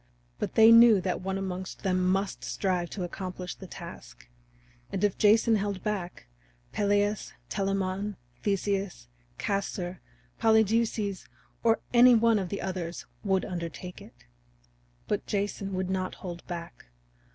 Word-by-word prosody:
But - - -3
they 225 0 +8
knew 230 -2 +8
that 185 0 -2
one 190 +1 -2
amongst 185 -1 -5
them 185 -1 +2
must 195 +1 -1
strive 180 -3 -1
to 190 - -4
accomplish 180 0 -5
the 190 - -11
task. - - -10 0.6
And - - -2
if 205 -2 +2
Jason 220 +1 +4
held 200 -2 -3
back, 195 -4 -3 0.5
Peleus, 205 0 +1 0.2
Telamon, 195 0 -1 0.3
Theseus, 195 - -1 0.3
Castor, 190 -3 -2 0.4
Polydeuces, 220 -2 +2 0.3
or 225 -1 +3
any 245 0 +8
one 230 -1 +4
of 185 -2 -3
the 200 - -4
others 180 -3 -4 0.2
would 190 -2 +1
undertake 175 0 -6
it. - - -16 0.8
But 210 - -2
Jason 200 -1 -2
would 185 0 -2
not 185 -1 -2
hold 175 -2 -7
back. 170 -1 -7
195 Hz, 130 wpm, -28 LUFS, 185-210 Hz, 0.8 s, they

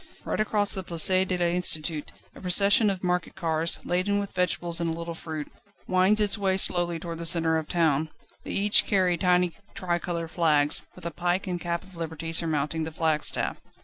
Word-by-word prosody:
Right - - -3
across 210 -1 0
the 190 - -4
Place 170 -3 +1 0.2
de 180 - -1
l'Institut 170 -3 -1 0.2
a - - -14
procession 200 +4 +4
of 190 -2 -4
market 180 -1 -1
carts, 165 -2 -1
laden 185 +3 0
with 200 -1 -5
vegetables 175 -2 -1
and 170 - -1
a - - -2
little 170 +1 -6
fruit, 160 -2 -7 0.4
wends 185 +3 +3
its 210 0 +3
way 190 -1 +1
slowly 175 -2 +2
towards 165 0 -7
the 170 - -5
centre 165 -1 +2
of 155 - -8
the - - -7
town. 160 -3 +1 0.3
They - - -9
each 205 +1 +3
carry 185 -3 +2
tiny 180 0 +2 0.2
tricolour 175 -2 -3
flags, 155 -3 +3
with 180 - -12
a 170 - -3
Pike 175 +5 -1
and 180 -2 -4
Cap 170 -1 -3
of 190 -1 -17
Liberty 165 0 -5
surmounting 160 -1 +1
the 160 - -5
flagstaff. 155 -1 0
175 Hz, 190 wpm, -26 LUFS, 165-185 Hz, 0.4 s, procession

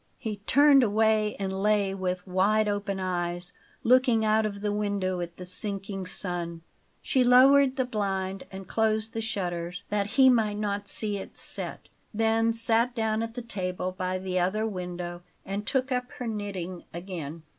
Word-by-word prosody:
He 220 -4 -4
turned 285 0 +6
away, 220 -1 +2
and 190 -1 -3
lay 205 -2 +2
with 185 -1 -3
wide 200 +3 +2
open 205 -1 -2
eyes, 175 -1 -3 0.3
looking 245 -2 +4
out 215 0 +3
of 200 -1 -7
the 210 0 -1
window 200 -3 -1
at 170 0 -6
the 180 - -8
sinking 195 0 -4
sun. 170 -3 -2 0.4
She 260 -3 +2
lowered 265 +2 +6
the 260 -1 0
blind 195 -5 -2
and 190 -1 -8
closed 220 +1 +1
the 225 - -2
shutters, 180 -5 -3
that 205 -1 0
he 265 -1 +8
might 220 -5 +3
not 205 -1 -2
see 210 -1 +4
it 195 - -9
set; - - -5 0.3
then 225 +1 +2
sat 230 +2 +1
down 220 -1 0
at 230 0 -5
the 245 - -5
table 185 -4 -3
by 185 0 -2
the 185 -1 -2
other 195 +5 0
window 180 -3 -5 0.2
and 200 +2 -4
took 260 0 0
up 250 0 -1
her 250 - -6
knitting 195 -5 -4
again. 170 -3 -7
205 Hz, 165 wpm, -27 LUFS, 185-225 Hz, 0.4 s, he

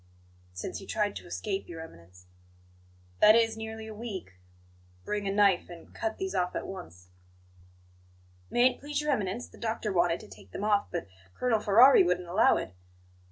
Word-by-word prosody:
"Since 90 0 -6
he 195 - -12
tried 205 -2 -1
to - - -11
escape, 195 +2 -4
Your 165 -1 -7
Eminence." 90 - -13 0.9
"That 215 +1 +8
is, 225 -1 +3
nearly 220 0 -7
a 220 - -8
week? 210 - -7 0.7
Bring 205 -1 -2
a - - 0
knife 200 -3 +3
and 170 -1 -12
cut 220 -1 -3
these 190 0 -3
off 180 -2 -1
at - - -3
once." 90 - -10 1.4
"May 245 +2 +4
it 245 - -14
please 290 0 -3
Your 300 0 0
Eminence, 210 -1 -2
the - - -17
doctor 220 -2 -2
wanted 170 -1 +2
to - - -12
take 95 -1 -15
them - - -5
off, 210 -1 +2
but 175 -2 -4 0.3
Colonel 235 -3 +1
Ferrari 225 +6 +7
wouldn't 180 0 +1
allow 190 +6 +4
it." 95 - -5
200 Hz, 175 wpm, -29 LUFS, 175-220 Hz, 1.4 s, That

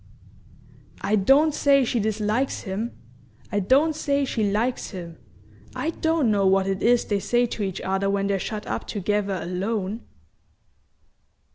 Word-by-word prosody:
"I 215 - +1
don't 275 +10 +4
say 275 -2 +4
she 235 - 0
dislikes 215 +4 -1
him! 205 +5 -4 0.5
I 205 - +1
don't 280 +11 +3
say 280 -2 0
she 220 -5 0
likes 230 +5 -1
him; 170 -4 -8 0.6
I 325 - -1
don't 320 -7 +1
know 200 -2 +2
what 190 0 +3
it 195 0 -2
is 240 +1 +3
they 205 -1 0
say 240 +4 +2
to 230 - -5
each 190 -2 -2
other 195 +1 0
when 200 0 0
they're 200 -1 0
shut 215 +2 -5
up - - -4
together 205 -1 -1
alone." 195 +4 -3
210 Hz, 150 wpm, -24 LUFS, 195-250 Hz, 0.6 s, don't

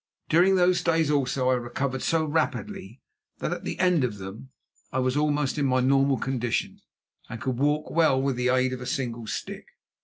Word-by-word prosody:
During 180 +4 +5
those 180 0 +3
days, 165 -3 +2
also, 130 -2 +1
I - - +4
recovered 130 +2 -2
so 165 -1 +1
rapidly 130 -7 -3 0.3
that - - -2
at - - -7
the - - -4
end 180 -6 +3
of 115 -5 -2
them 100 +7 -9 0.4
I - - -3
was 130 0 +1
almost 150 -1 0
in 140 - +2
my 130 0 +2
normal 135 +1 +3
condition, 120 -1 -2 0.5
and 120 -2 -6
could 125 +1 -3
walk 150 +2 0
well 160 -5 +3
with 135 -1 0
the 125 +1 0
aid 130 0 +2
of 125 - -6
a 125 - -6
single 120 -4 -3
stick. - - -6
130 Hz, 190 wpm, -26 LUFS, 125-150 Hz, 0.5 s, During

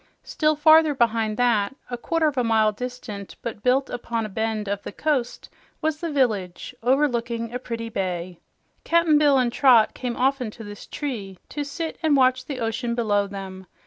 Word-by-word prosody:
Still 310 0 +1
farther 315 0 +5
behind 225 -3 +1
that 235 -1 +2 0.2
a - - -1
quarter 325 +7 -1
of 300 -2 +1
a 250 - +1
mile 220 -2 +3
distant 215 -3 -7
but 225 -3 -5
built 260 +3 +2
upon 235 -2 -3
a - - -6
bend 220 0 -2
of 200 0 -2
the - - -7
coast 260 0 -2 0.3
was 310 -1 -1
the 335 -1 -3
village, 215 -11 -1
overlooking 235 -3 0
a 250 - -3
pretty 230 -2 -5
bay. 180 -4 -4 0.4
Cap'n 335 -3 +3
Bill 290 -2 +4
and 245 -2 +1
Trot 250 -6 +5
came 245 -2 -4
often 260 -2 +1
to 225 +1 -11
this 205 -1 -10
tree 215 -10 -5
to 295 - -3
sit 320 +3 -5
and 310 -4 +3
watch 255 -1 +3
the 275 -2 -5
ocean 235 +1 -2
below 205 -4 +1
them. 190 -1 -8
240 Hz, 180 wpm, -24 LUFS, 215-275 Hz, 0.4 s, farther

